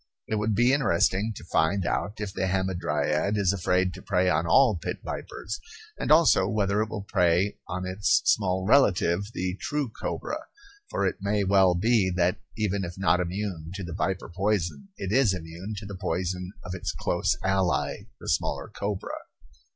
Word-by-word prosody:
It 110 - -1
would 105 0 0
be 120 +4 +4
interesting 105 -4 +2
to - - -9
find 90 +3 +1
out 105 +4 -2
if 105 -2 -4
the 95 - -1
hamadryad 90 -1 0
is 100 -2 +2
afraid 90 -1 +1
to - - -10
prey 90 -2 +1
on 80 +2 +1
all 125 +3 +5
pit - - -3
vipers, 105 - -5 0.4
and - - -2
also 155 - +6
whether 100 -1 +1
it 110 - -1
will 105 -2 -5
prey 90 +1 +2
on 95 0 -3
its 95 +2 +2
small 95 -2 +2
relative, 100 -6 +3
the 90 +1 -2
true 145 -3 -1
cobra - - -4 0.5
for - - 0
it - - 0
may 100 +1 +1
well 95 -2 +4
be 105 +1 +3
that, 90 +3 +1 0.2
even 100 -2 0
if 85 0 -6
not 95 -1 +3
immune 90 -2 -3
to 95 - -5
the 85 -2 -6
viper 95 -1 -2
poison, 100 - -1
it 95 - -4
is 115 -5 +4
immune 85 +5 -7
to 100 - -6
the 100 -2 -8
poison 90 +1 -2
of 90 - -5
its 95 - -3
close - - 0
ally, 95 -2 0
the - - -10
smaller - - -1
cobra. 100 -1 -4
95 Hz, 175 wpm, -27 LUFS, 90-105 Hz, 0.5 s, also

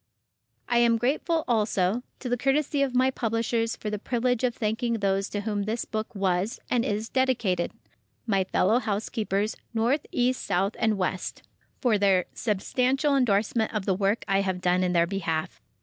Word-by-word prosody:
I 240 - +3
am 235 -1 +4
grateful, 305 +7 0
also, 210 -2 +1 0.2
to 255 - -4
the 245 - +1
courtesy 280 +3 +1
of 265 -2 0
my 260 +1 +4
publishers 230 -1 -1
for 210 - -5
the 210 - -3
privilege 245 +2 0
of 250 -1 +1
thanking 230 +1 -1
those 195 -2 0
to 205 - -3
whom 205 -1 -2
this 225 +2 -2
book 220 +1 -4
was, 195 +4 0
and 245 -2 +2
is 210 +1 -2
dedicated, 235 -10 +1 0.5
"My 195 -4 +2
fellow 210 +5 +2
housekeepers—North, 220 +4 -1
East, 250 +1 +1
South 195 +2 0
and 220 -2 +2
West"—for 195 +4 -3
their 195 -3 +3
substantial 255 +7 +1
endorsement 220 -2 +1
of 210 -3 -1
the 195 - +2
work 200 +4 0
I 195 0 +2
have 190 -2 -1
done 180 0 +2
in 180 -1 +1
their 170 -1 +4
behalf. 165 -4 -3
220 Hz, 165 wpm, -26 LUFS, 195-245 Hz, 0.5 s, am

